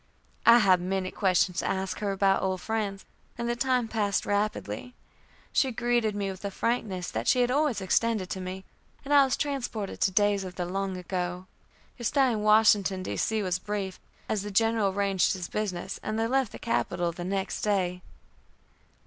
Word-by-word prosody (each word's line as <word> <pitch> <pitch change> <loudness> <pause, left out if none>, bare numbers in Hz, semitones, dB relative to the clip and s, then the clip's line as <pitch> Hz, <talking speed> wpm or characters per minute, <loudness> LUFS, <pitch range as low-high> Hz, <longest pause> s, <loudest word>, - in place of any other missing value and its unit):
I 235 0 +10
had 190 -6 +4
many 185 +1 -2
questions 185 -2 +1
to - - -1
ask 190 0 -2
her 205 -2 -1
about 195 0 +2
old 190 -1 -1
friends, 205 -1 -3 0.3
and 235 0 -3
the 240 - 0
time 250 -1 +1
passed 205 -3 0
rapidly. 210 +4 -2 0.6
She 265 - +2
greeted 240 -2 0
me 200 -1 -2
with 190 - -10
the 200 - -3
frankness 200 -4 -2
that 115 +2 -3
she 250 - +4
had 245 0 +2
always 285 -6 +1
extended 210 +1 +1
to 190 - -3
me, 185 +1 -6 0.4
and 290 - 0
I 285 -1 +8
was 265 - 0
transported 245 -8 -3
to - - +4
days 205 +1 +2
of 185 -1 -7
the 180 - -2
long 190 +1 -3
ago. 180 0 -3 0.5
Her - - -7
stay 265 +2 +3
in 215 -2 -1
Washington 210 -3 +4 0.4
was 185 -1 -1
brief, 195 -2 -4 0.3
as 215 - -1
the 205 - -5
General 225 0 +2
arranged 195 -2 +1
his 180 -2 -5
business, 190 -3 -3
and 215 0 -3
they 225 - +1
left 260 0 +1
the - - -8
capital 175 -6 -1
the 175 +1 -7
next 190 +1 -2
day. 185 -4 0
200 Hz, 185 wpm, -28 LUFS, 185-225 Hz, 0.6 s, I